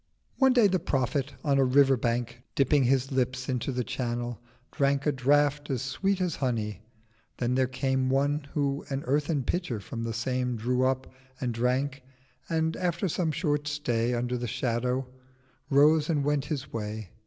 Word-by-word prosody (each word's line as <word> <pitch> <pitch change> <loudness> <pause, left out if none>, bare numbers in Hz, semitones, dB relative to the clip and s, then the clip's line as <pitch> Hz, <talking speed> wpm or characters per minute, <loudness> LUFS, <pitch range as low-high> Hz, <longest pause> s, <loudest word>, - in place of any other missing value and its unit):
One 265 -1 +6
day 240 -4 +5
the 185 -2 +3
Prophet 135 -1 -1
on 140 -3 +2
a - - +5
River 135 +1 +5
Bank, 120 0 -2
Dipping 135 0 +3
his 135 +1 +2
Lips 130 -1 -1
into 130 0 -1
the 125 -1 -1
Channel, 120 -2 -3 0.3
drank 140 0 +1
A 150 - +3
Draught 145 +2 +2
as 130 -3 -1
sweet 195 +9 0
as 180 -4 -1
Honey. 110 -6 -2 0.6
Then 125 0 0
there 130 0 +2
came 130 0 0
One 140 +2 +1
who 140 -1 0
an 135 0 -2
earthen 145 +1 +1
Pitcher 130 - -2
from 115 +3 -6
the 115 0 -2
same 125 +2 -1
Drew 125 +3 +1
up, 130 0 -1 0.3
and 125 -2 -1
drank: 130 +4 0 0.5
and 160 0 0
after 175 +1 0
some 165 -1 0
short 150 -2 -1
stay 125 -5 0
Under 125 +1 -1
the 120 - -3
Shadow, 125 +1 -1 0.6
rose 150 +2 +5
and 150 -4 +1
went 145 -1 +1
his 140 -4 -4
Way. 105 -3 -5
135 Hz, 170 wpm, -28 LUFS, 125-145 Hz, 0.6 s, One